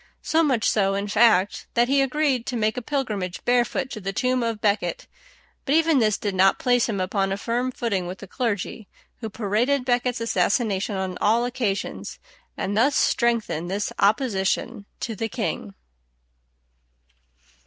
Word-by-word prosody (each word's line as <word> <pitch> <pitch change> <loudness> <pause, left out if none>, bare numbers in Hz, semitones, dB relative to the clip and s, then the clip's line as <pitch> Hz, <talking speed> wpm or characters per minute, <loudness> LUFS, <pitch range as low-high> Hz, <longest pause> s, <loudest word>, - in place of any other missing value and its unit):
So 320 - +2
much 260 -8 +2
so, 195 -2 +2
in 200 +1 -2
fact, 205 -2 +3
that 240 0 +4
he 275 +1 +3
agreed 270 -2 0
to 250 - -2
make 220 -1 0
a 250 - -3
pilgrimage 215 -10 -3
barefoot 245 +2 +1
to 215 - -6
the 195 +1 -3
tomb 255 +4 0
of 230 -2 -1
à - - -34
Becket; 215 - 0 0.6
but 285 +1 +1
even 325 -3 +4
this 215 -3 +2
did 205 -2 -3
not 190 +1 +4
place 245 -1 +2
him 200 -3 -2
upon 195 +1 0
a 195 - -1
firm 240 +4 -1
footing 200 -8 -2
with 185 +2 -6
the 200 - -10
clergy, 220 -2 -3 0.3
who 225 -3 -5
paraded 235 +6 0
à - - -19
Becket's 245 -1 0
assassination 205 -1 0
on 190 -1 -3
all 230 +3 +3
occasions, 240 -5 -3 0.4
and 200 +1 -2
thus 265 +6 +3
strengthened 225 -8 +1
this 200 +2 -2
opposition 200 -2 0
to 225 - -3
the 225 +2 -3
king. 210 - -4
225 Hz, 165 wpm, -24 LUFS, 200-250 Hz, 0.6 s, that